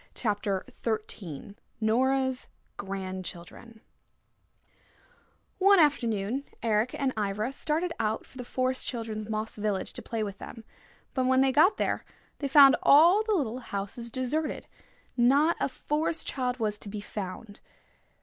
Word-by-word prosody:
CHAPTER 205 -4 -1 0.2
XIII 205 -6 -4 0.3
NORA'S 260 +3 +1 0.3
GRANDCHILDREN 190 +3 -7 1.8
One 395 +1 +6
afternoon 240 -5 +1 0.2
Eric 225 +2 +1
and 270 -2 0
Ivra 210 +3 -1
started 320 +5 -1
out 220 -1 -1
for - - -21
the - - -4
Forest 255 +1 -1
Children's 220 -3 -4
moss 215 0 -3
village 205 -2 -2
to - - -5
play 225 -2 -3
with 200 -1 -6
them. 225 - -9 0.5
But 260 -1 0
when 260 0 +4
they 270 0 +4
got 310 +9 +4
there - - -1 0.4
they 280 - -1
found 275 0 +8
all 340 +8 +7
the 435 0 0
little 255 - -1
houses 225 +1 -5
deserted: 260 +6 -2 0.5
not 280 +7 +4
a - - 0
Forest 305 +4 -1
Child 250 -2 -2
was 210 -3 -2
to 205 - -7
be 210 +1 -5
found. 205 +1 -7
235 Hz, 135 wpm, -28 LUFS, 210-270 Hz, 1.8 s, found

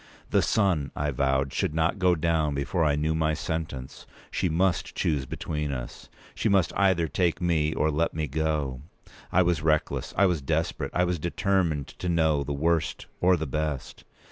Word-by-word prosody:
The - - +4
sun, 90 -10 +1
I 75 0 -1
vowed, 70 0 0
should 75 - -1
not 80 +5 +1
go 90 -2 +4
down 80 -2 +1
before 75 +5 0
I 75 -2 +3
knew 75 +2 0
my 80 -1 +1
sentence. 80 -7 -5 0.2
She 90 - 0
must 90 +3 0
choose 70 -5 0
between 75 +1 -3
us. 60 -3 -7 0.2
She 110 - 0
must 95 -4 +3
either 95 -4 +3
take 85 0 0
me 80 -3 +1
or 80 - +1
let 80 +2 0
me 80 -1 -1
go. 75 -3 -1 0.5
I 90 - +4
was 85 -3 +1
reckless. 75 -1 0
I 100 - +5
was 90 -5 +1
desperate. 80 +4 -1
I 90 - +2
was 90 -1 0
determined 85 -3 0
to 90 - -2
know 80 -4 +2
the 70 - -5
worst, 80 +2 0
or 90 0 +4
the 80 - -3
best. 75 -1 -3
80 Hz, 180 wpm, -27 LUFS, 75-85 Hz, 0.5 s, I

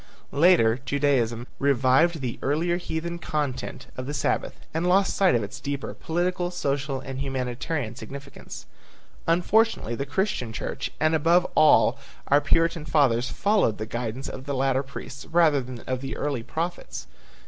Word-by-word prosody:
Later 140 -7 +5
Judaism 130 -4 +1
revived 140 +4 +3
the 125 -3 -4
earlier 165 +5 +1
heathen 170 0 -4
content 135 -5 -3
of 130 0 -5
the 145 - -3
Sabbath, - - -1 0.2
and 165 +3 0
lost 195 +2 +3
sight 190 -8 +4
of 115 - +1
its 100 - -7
deeper 140 0 -4
political, 175 +1 -1
social 140 -5 -2
and 130 0 -6
humanitarian 130 -1 -3
significance. 140 +2 -9 0.6
Unfortunately 180 - +2
the 140 +4 -3
Christian 145 - -1
church - - -4
and 155 +1 +3
above 165 +3 +4
all 140 -4 +5 0.3
our 145 +1 +5
Puritan 165 0 +2
fathers 130 -5 +2
followed 200 - +2
the 110 - -4
guidance 120 +3 -4
of 130 - -7
the 140 -1 -2
later 135 0 +2
priests 135 0 -9
rather 160 -4 +4
than 125 -2 -8
of 130 0 -3
the 135 - -5
early 140 -5 -1
prophets. 170 +8 -4
140 Hz, 150 wpm, -25 LUFS, 130-165 Hz, 0.6 s, Later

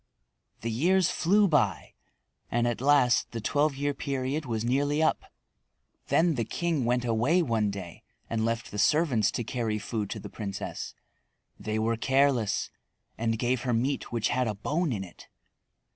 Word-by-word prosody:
The 115 - -2
years 175 +10 +2
flew 200 +4 +3
by, 105 - +1 0.6
and 120 0 +1
at 120 0 -2
last 135 -5 +3
the 115 - -3
twelve 145 +6 +1
year 145 +1 -1
period 140 +2 -3
was 115 -1 -2
nearly 145 +5 +1
up. 155 - +1 0.8
Then 170 0 +3
the 120 -5 -1
king 155 +3 -1
went 125 +1 +1
away 125 +10 +2
one 115 -7 +1
day 95 -4 -7 0.3
and 110 -1 -1
left 115 0 -2
the 105 - -4
servants 135 - +3
to 120 - -3
carry 110 -1 -2
food 105 -1 -3
to - - -4
the - - -8
princess. 100 -3 -6 0.6
They 110 0 -3
were 115 +1 0
careless, 130 -4 +1 0.4
and 115 0 -1
gave 120 +1 0
her 125 -1 -1
meat 135 +5 -1
which 115 -3 0
had 125 0 +1
a 105 - -2
bone 150 - -1
in 100 -5 -2
it. 90 - -13
120 Hz, 165 wpm, -28 LUFS, 110-145 Hz, 0.8 s, flew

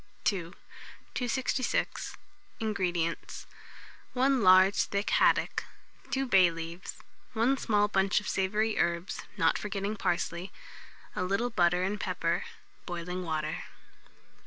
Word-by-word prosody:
II. 180 -4 0 0.6
266. 255 0 -1 0.4
INGREDIENTS. 180 -6 -2 0.7
1 265 0 +3
large 185 +1 +6
thick 200 +1 -2
haddock, - - +3 0.5
2 270 0 0
bay 190 -7 +6
leaves, 165 +2 -7 0.4
1 235 +5 +3
small 205 -2 +2
bunch 195 -1 +2
of 205 - -9
savoury 210 +3 0
herbs, 170 +2 0 0.2
not 165 - +3
forgetting 205 0 -3
parsley, 175 -1 -2 0.6
a - - -1
little 200 +6 0
butter 180 -2 +3
and 200 +2 -1
pepper; 175 -2 -1 0.4
boiling 180 +1 -4
water. 155 -3 -3
190 Hz, 110 wpm, -30 LUFS, 175-210 Hz, 0.7 s, large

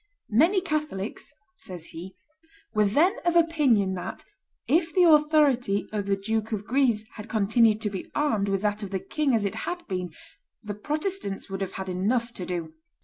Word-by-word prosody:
"Many 335 - +4
Catholics," 300 - -3 0.3
says 180 -3 -8
he, 175 +4 -10 0.6
"were 215 -1 +3
then 330 - +3
of 345 -1 +1
opinion 290 - +3
that, 180 - -6 0.4
if 325 +2 +2
the 365 - +6
authority 300 - +4
of 205 -2 -2
the 200 - +2
Duke 220 +2 -2
of 205 -2 -3
Guise 240 -4 +2
had 210 +1 -8
continued 220 +1 +3
to 210 -2 -1
be 190 - -6
armed 220 -10 +1
with 195 0 -1
that 210 0 0
of 200 - -5
the 190 0 -2
king 290 +3 0
as 215 -2 +1
it 200 - -1 0.2
had 350 0 -5
been, 180 -3 -3 0.5
the 210 -1 -4
Protestants 300 - -3
would 195 0 -4
have 190 -1 -3
had 190 0 -5
enough 230 +6 0
to 180 - -6
do. 170 -3 -4
215 Hz, 180 wpm, -26 LUFS, 195-300 Hz, 0.6 s, the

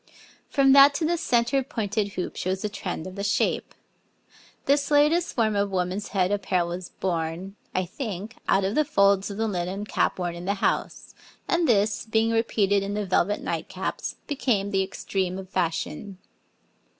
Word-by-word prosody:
From 275 -2 +4
that 280 +1 +8
to 315 - 0
the 345 +2 +2
centre 245 -3 +1
pointed 215 -6 -2
hoop 180 - -4
shows 185 +1 -2
the 210 - -1
trend 180 -5 -5
of 185 - -7
the 200 +1 -5
shape. 200 0 0 0.9
This 285 0 +2
latest 300 +4 +3
form 220 -3 +2
of 200 0 +1
woman's 185 +2 -2
head 185 -2 +1
apparel 190 -4 0
was 175 +1 -5
born, 175 +2 -3 0.2
I 185 - +1
think, 215 +1 -6
out 195 - +3
of 195 +2 0
the 305 - +3
folds 200 -8 +3
of 200 - -6
the 225 0 0
linen 190 +1 -3
cap - - 0
worn 175 -2 -2
in 170 +1 -8
the 200 +2 0
house, 195 - -2 0.3
and 345 -2 +2
this, 210 -1 +2
being 220 +1 +2
repeated 205 -3 +2
in 200 +1 -3
the 210 -1 -1
velvet 190 +2 +1
night - - -3
caps, - - -4
became 230 -9 0
the 195 -1 +2
extreme 190 -1 -2
of 190 -1 -8
fashion. 180 +2 -2
200 Hz, 175 wpm, -25 LUFS, 185-230 Hz, 0.9 s, that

